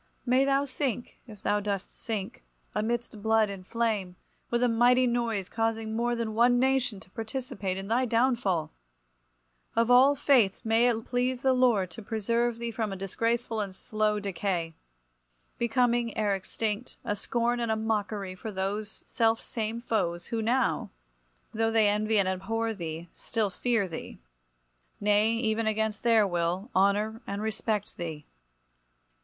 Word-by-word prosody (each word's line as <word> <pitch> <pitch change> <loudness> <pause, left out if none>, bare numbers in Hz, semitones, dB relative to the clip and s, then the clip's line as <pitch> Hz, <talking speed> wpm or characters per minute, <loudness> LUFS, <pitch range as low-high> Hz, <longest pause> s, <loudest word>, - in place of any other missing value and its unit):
May 255 +2 +4
thou 275 0 +2
sink, 260 -3 -3
if 210 -3 -12
thou 205 0 +2
dost 200 -2 -3
sink, 210 -4 -5 0.3
amidst 225 0 -2
blood 220 -1 +3
and 185 -2 -9
flame, 215 -6 -1 0.3
with 240 +1 +1
a - - +5
mighty 245 +2 +4
noise, 235 -5 0
causing 225 0 -1
more 240 +1 +1
than 230 -2 -2
one 240 +2 +4
nation 255 -4 +1
to - - -17
participate 225 -4 -4
in 195 0 -5
thy 240 +4 +2
downfall! 230 - +1 1.0
Of 230 +1 +3
all 265 +3 +7
fates, 245 -9 +3
may 225 +2 +4
it 225 -1 -1
please 250 +1 -1
the 265 -1 +4
Lord 235 -8 +3
to 225 - -9
preserve 230 +2 0
thee 235 0 -3
from 220 -2 -2
a - - -3
disgraceful 230 +4 -1
and 200 - -3
a - - -14
slow 215 +2 0
decay; 180 -4 -2 0.9
becoming, 235 0 +1
ere 210 -2 +2
extinct, 210 +4 -3
a 205 -3 0
scorn 240 +3 0
and 235 -2 0
a - - +2
mockery 210 -3 -2
for 200 +4 -7
those 200 +2 -4
self 225 -1 +2
same 225 0 -4
foes 175 -8 -1
who 225 - 0
now, 245 +4 +1 0.6
though 225 +1 +1
they 225 -2 +4
envy 215 +1 +2
and 195 -2 +3
abhor 225 +5 -1
thee, 165 -3 -6
still 215 -4 -2
fear 230 -2 0
thee, 165 -3 -7 0.8
nay 210 +2 +3
even 225 -1 0
against 220 -1 0
their 225 -3 +4
will, 180 +4 -1
honour 205 +4 +2
and 200 +1 -3
respect 215 -1 -2
thee…. 160 -3 -5
220 Hz, 155 wpm, -28 LUFS, 200-235 Hz, 1.0 s, all